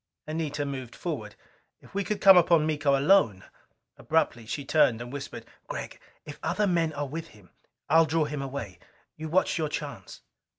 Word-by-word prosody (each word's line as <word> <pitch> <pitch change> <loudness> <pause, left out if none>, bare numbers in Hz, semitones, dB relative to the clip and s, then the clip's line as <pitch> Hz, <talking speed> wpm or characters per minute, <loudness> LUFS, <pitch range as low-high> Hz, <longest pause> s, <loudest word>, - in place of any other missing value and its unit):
Anita 155 -2 -3
moved 130 -4 -6
forward. 120 -12 -5 0.4
If - - -19
we 200 +1 -1
could 200 +2 -3
come 195 -1 +9
upon 170 -3 +5
Miko 145 -3 +2
alone! 135 - +3 0.5
Abruptly 120 -8 0
she 140 +4 -4
turned 125 -6 +3
and 120 +2 -8
whispered, 140 -1 -7 0.2
"Gregg, - - -6 0.3
if 145 - -9
other 180 +6 0
men 170 -4 +1
are 145 -1 -3
with 160 +4 -6
him, 105 - -19 0.4
I'll 160 +2 +5
draw 160 0 +1
him 150 -1 -4
away. 130 -8 -6 0.4
You 160 0 -6
watch 175 0 +1
your 155 -2 -1
chance." - - -6
150 Hz, 170 wpm, -27 LUFS, 135-165 Hz, 0.5 s, come